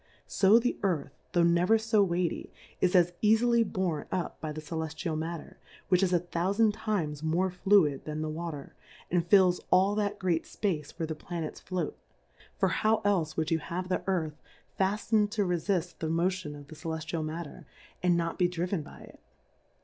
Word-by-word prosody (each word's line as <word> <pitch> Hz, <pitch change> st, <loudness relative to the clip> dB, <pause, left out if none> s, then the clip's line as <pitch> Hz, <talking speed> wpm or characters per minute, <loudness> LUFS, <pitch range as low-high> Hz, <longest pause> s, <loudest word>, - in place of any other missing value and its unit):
So 200 Hz, +3 st, +5 dB
the 245 Hz, +1 st, 0 dB
Earth, 175 Hz, -7 st, 0 dB, 0.2 s
tho' 175 Hz, -, +4 dB
never 175 Hz, +6 st, +4 dB
fo 220 Hz, -1 st, +2 dB
weighty, 175 Hz, -3 st, -1 dB, 0.3 s
is 185 Hz, 0 st, +2 dB
as 175 Hz, -1 st, +5 dB
eafily 230 Hz, +2 st, +4 dB
born 175 Hz, -6 st, -1 dB
up 180 Hz, -, -3 dB
by 155 Hz, -, -3 dB
the 155 Hz, -, -6 dB
Celeftial 160 Hz, +1 st, -4 dB
Matter, 160 Hz, +1 st, -5 dB, 0.3 s
which 180 Hz, -1 st, +4 dB
is 190 Hz, -2 st, +2 dB
a 175 Hz, -, +4 dB
thoufand 190 Hz, +6 st, +1 dB
times 195 Hz, -10 st, -2 dB
more 170 Hz, +4 st, +1 dB
fluid 180 Hz, -6 st, +3 dB
than 155 Hz, 0 st, -3 dB
the -, -, -2 dB
Water, 155 Hz, -2 st, -5 dB, 0.4 s
and 175 Hz, -1 st, +1 dB
fills 185 Hz, -2 st, +5 dB
all 190 Hz, +2 st, +4 dB
that 205 Hz, 0 st, -1 dB
great 175 Hz, -4 st, 0 dB
fpace 160 Hz, -9 st, -2 dB
where 165 Hz, -, -1 dB
the 160 Hz, -, -3 dB
Planets 165 Hz, 0 st, -6 dB
float; 185 Hz, -1 st, -3 dB, 0.6 s
for -, -, +2 dB
how 220 Hz, 0 st, +1 dB
elfe 180 Hz, -6 st, +1 dB
would 160 Hz, 0 st, -1 dB
you 165 Hz, -, +2 dB
have 180 Hz, +3 st, -5 dB
the 185 Hz, -, 0 dB
Earth 160 Hz, -5 st, -1 dB, 0.4 s
fafl:ned 205 Hz, +2 st, +2 dB
to 210 Hz, -3 st, +1 dB
refitt 180 Hz, 0 st, -1 dB
the 160 Hz, -, -2 dB
Motion 170 Hz, -2 st, -1 dB
of 145 Hz, -1 st, -11 dB
the 155 Hz, -, -10 dB
Celeftial 160 Hz, +1 st, -4 dB
Mat 160 Hz, +2 st, -4 dB
ter, 145 Hz, -, -12 dB, 0.3 s
and 180 Hz, -1 st, +3 dB
not 165 Hz, +1 st, -2 dB
be 180 Hz, -, +4 dB
driven 175 Hz, 0 st, -2 dB
by 145 Hz, -, -12 dB
it -, -, -14 dB
175 Hz, 180 wpm, -29 LUFS, 160-195 Hz, 0.6 s, So